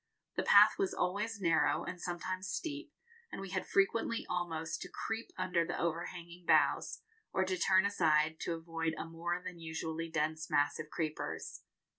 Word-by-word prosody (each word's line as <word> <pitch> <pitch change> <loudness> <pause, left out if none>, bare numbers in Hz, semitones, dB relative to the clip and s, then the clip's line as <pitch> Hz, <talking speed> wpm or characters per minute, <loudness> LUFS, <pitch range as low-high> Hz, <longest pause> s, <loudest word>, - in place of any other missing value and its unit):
The - - +1
path - - +7
was 390 0 0
always 205 +4 -1
narrow 165 -4 +3
and 180 -1 -6
sometimes 185 +2 -3
steep, 300 - -4 0.4
and - - -5
we 195 -1 -6
had 185 - -2
frequently 225 +3 +2
almost 165 -3 -2
to - - -6
creep 225 +1 -4
under 180 -2 +1
the 175 +1 -3
overhanging 170 +1 -4
boughs, - - +3 0.3
or 190 - +1
to 185 0 0
turn 190 +2 +4
aside 160 -5 +3
to 170 - -2
avoid 165 0 -2
a - - -4
more 170 +2 -3
than 180 -2 -6
usually 165 0 -4
dense 155 0 -1
mass 145 +1 +2
of 155 -1 -5
creepers. 155 -1 -4
175 Hz, 165 wpm, -34 LUFS, 165-190 Hz, 0.4 s, path